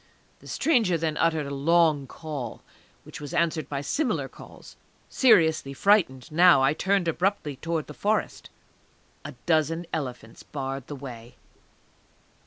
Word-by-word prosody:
The - - -15
stranger 225 - +2
then 160 -1 -2
uttered 160 -3 +1
a 140 - -5
long 155 -1 +2
call, 140 -6 -7 0.4
which - - -10
was 145 - -6
answered 165 -2 0
by 140 -1 -3
similar 250 - -1
calls. - - -14 0.3
Seriously 160 - +3
frightened 155 - +2
now, 170 -3 +6
I 135 +2 +3
turned 195 +1 0
abruptly 165 -4 -1
towards 165 0 -3
the 150 - -9
Forest. 210 +7 -2 0.7
A - - -7
dozen 165 +1 +1
elephants 125 -7 -5
barred 135 -2 -6
the 145 - -6
way. 125 -4 -10
155 Hz, 135 wpm, -26 LUFS, 140-170 Hz, 0.7 s, now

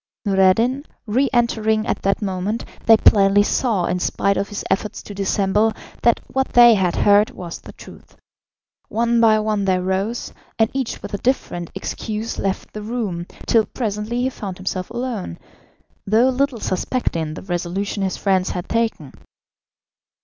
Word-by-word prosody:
Noureddin 205 +7 +3 0.2
re 250 +6 +1
entering 220 -3 +1
at - - -2
that 195 +2 0
moment, 195 +3 -2 0.2
they 225 -1 +8
plainly 200 -1 +5
saw, 210 -5 +1
in 180 +1 -1
spite 200 +2 0
of 200 - -2
his 205 - -5
efforts 210 +2 -2
to 205 - -9
dissemble, 200 +2 +1 0.3
that 235 - +4
what 265 0 -2
they 240 -1 +8
had 185 -4 +1
heard 205 +1 +4
was 175 -2 -8
the - - -12
truth. - - -15 0.7
One 235 +1 +1
by 220 -1 +5
one 215 -2 0
they 190 -1 +2
rose, 190 +5 -2 0.2
and 225 0 +2
each 265 -3 -3
with - - -7
a 200 - -2
different 175 -9 -1
excuse 220 +1 -4
left 195 -1 -3
the 215 - -6
room, 210 -6 -3 0.2
till 220 -3 +3
presently 225 +1 -3
he 260 - 0
found 195 -7 -6
himself 185 -1 -4
alone, 235 - -4 0.7
though 225 +5 +4
little 260 -1 0
suspecting 170 -7 -2
the - - -8
resolution 190 +3 -3
his 190 -1 -1
friends 190 -2 +1
had 180 - -4
taken. 225 - -1
210 Hz, 155 wpm, -21 LUFS, 190-230 Hz, 0.7 s, they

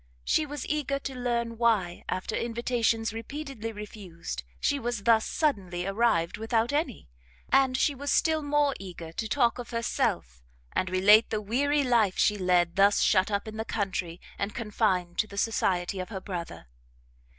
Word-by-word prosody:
She 310 - +1
was 290 -2 -5
eager 290 -2 -1
to 275 -1 -6
learn 235 -2 -2
why, 210 -7 +1
after 185 +4 -2
invitations 230 -1 0
repeatedly 230 -1 -6
refused, 195 - -7 0.2
she 285 - +1
was 240 -4 -3
thus 225 -1 +4
suddenly 185 - -1
arrived 195 -4 +1
without 225 +3 0
any; 290 - -2 0.4
and 265 -1 +4
she 290 - +2
was 285 +1 -3
still 315 -1 +2
more 290 -1 +2
eager 175 -4 -8
to 220 +6 -4
talk 240 -1 +2
of 245 - -7
herself, 65 - -1 0.3
and 185 - 0
relate 205 +4 +6
the 215 - -1
weary 280 +8 +1
life 230 -7 +2
she 210 - +3
led 180 -3 +2
thus 200 +1 +5
shut 185 +3 +3
up 200 +1 -2
in 215 0 -7
the 220 - -2
country, 190 -5 -3 0.2
and 200 +1 -3
confined 195 -6 -1
to 215 - +2
the 200 - -11
society 190 -4 0
of 185 - -5
her 200 -4 -5
brother. 175 - -6
220 Hz, 165 wpm, -28 LUFS, 190-245 Hz, 0.4 s, relate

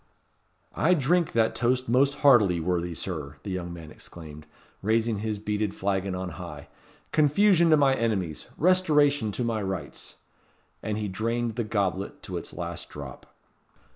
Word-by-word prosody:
"I 180 +4 +3
drink 170 +3 +1
that 115 -1 +2
toast 125 +2 0
most 135 +4 +3
heartily, 105 -11 +6
worthy 85 0 -1
Sir," 75 -6 -5
the 100 - -5
young 90 -2 -4
man 80 -3 -9
exclaimed, 75 -3 -12 0.3
raising 110 +1 +1
his 110 0 -2
beaded 105 0 -2
flagon 95 -1 -1
on 90 0 -4
high. 75 -5 -9 0.4
"Confusion 170 +3 +4
to 155 - +6
my 140 -2 +4
Enemies 100 - -2
Restoration 150 - +3
to 125 - -2
my 115 -2 -1
Rights!" 95 -7 -5 0.7
And 105 -1 -3
he 105 -1 -2
drained 115 +3 -2
the 120 - -1
goblet 100 -2 -2
to - - -5
its - - -6
last - - -6
drop. - - -9
110 Hz, 150 wpm, -27 LUFS, 95-130 Hz, 0.7 s, heartily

